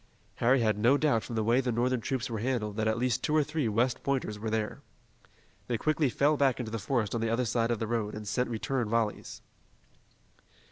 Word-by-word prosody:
Harry 125 +2 +3
had 110 -2 +1
no 120 +6 +4
doubt 145 -7 +2
from 115 - -7
the 110 - 0
way 120 +4 +3
the 125 -1 -1
Northern 120 +1 0
troops 130 +1 -2
were 115 -2 -4
handled 110 -3 -1
that 110 0 0
at 110 +1 +1
least 125 0 0
two 150 - 0
or 155 - +4
three 150 -3 -2
West 120 +4 +1
Pointers 130 -6 -2
were 110 +1 -3
there. 110 -1 -2 0.9
They 120 - 0
quickly 155 +2 +1
fell 145 +4 +2
back 135 -3 +2
into 115 -3 -4
the 115 - -3
forest 115 -3 -1
on 115 - -1
the 115 - 0
other 120 +2 +1
side 115 0 0
of 120 - +1
the 115 - -2
road, 110 -2 -2
and 105 -1 -7
sent 125 +4 0
return 120 0 -2
volleys. 115 -2 -2
120 Hz, 225 wpm, -29 LUFS, 110-130 Hz, 0.9 s, no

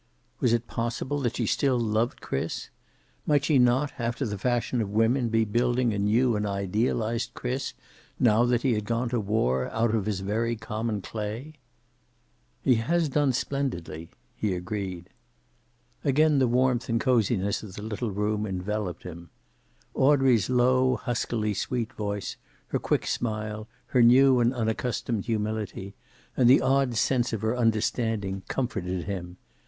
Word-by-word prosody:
Was 125 - +2
it 120 0 +1
possible 120 +5 -2
that 120 -4 -1
she 120 - 0
still 130 +3 +2
loved 115 +1 0
Chris? 70 - -4 0.6
Might 145 -1 +3
she 150 -4 +4
not, 125 +4 +3
after 120 +3 -1
the 105 -3 -3
fashion 120 +1 0
of 105 - -2
women, 115 +4 +2
be 115 0 +2
building 120 +2 +1
a 100 - -2
new 115 +4 +2
and 105 - -1
idealized 110 +4 -1
Chris, 130 +2 -3 0.4
now 115 -1 +4
that 120 -1 +1
he 130 -3 +3
had 105 -1 -2
gone 115 +2 -1
to 120 -1 0
war, 65 - 0
out 115 0 0
of 105 -3 0
his 100 -3 -1
very 115 +4 -1
common 110 -1 -3
clay? 110 +7 -5 1.1
"He 125 -3 +4
has 165 +5 +1
done 145 0 +2
splendidly," 100 - -3 0.3
he 100 -4 -1
agreed. 90 -1 -5 0.9
Again 150 +1 +3
the 130 - +3
warmth 125 0 +1
and 115 0 +1
coziness 110 -5 +1
of 100 -4 -10
the 105 - -7
little 110 +2 -3
room 105 +1 -1
enveloped 95 -1 -3
him. 85 -1 -9 0.6
Audrey's 130 -6 +3
low 130 +1 +3
huskily 115 -3 -2
sweet 120 +4 -2
voice, 100 -2 -4 0.3
her - - 0
quick - - 0
smile, 110 -1 -3 0.2
her 125 - +3
new 130 +2 +6
and 120 0 +3
unaccustomed 115 -2 -2
humility, 105 -3 -3 0.4
and 125 -2 +4
the 130 - +7
odd 135 -2 +2
sense 120 0 +1
of 110 -1 -3
her 110 +2 +1
understanding, 110 -4 0
comforted 95 -9 -2
him. 90 -3 -5
115 Hz, 150 wpm, -27 LUFS, 105-125 Hz, 1.1 s, the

